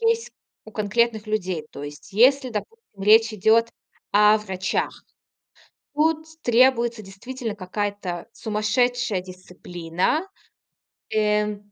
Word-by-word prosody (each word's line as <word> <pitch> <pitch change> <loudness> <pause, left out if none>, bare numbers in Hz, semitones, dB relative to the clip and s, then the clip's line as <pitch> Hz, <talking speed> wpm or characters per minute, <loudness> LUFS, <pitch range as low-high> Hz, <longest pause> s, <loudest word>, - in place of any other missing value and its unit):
есть 460 0 +1 0.3
у 220 - -12
конкретных 220 +1 0
людей. 185 -7 -2
То 140 - -9
есть 145 +4 -10
если, 260 +5 +4
допустим, 220 - -7
речь 220 +2 +6
идет 220 +3 +3 0.4
о 210 +1 +6
врачах, 190 -3 -2 1.0
тут 315 +1 +1 0.2
требуется, 240 -2 +3
действительно, 225 +4 -6
какая-то 195 -2 -4
сумасшедшая 220 0 0
дисциплина. 180 - -3 0.9
Э, 210 -1 +1
215 Hz, 95 wpm, -23 LUFS, 195-240 Hz, 1.0 s, речь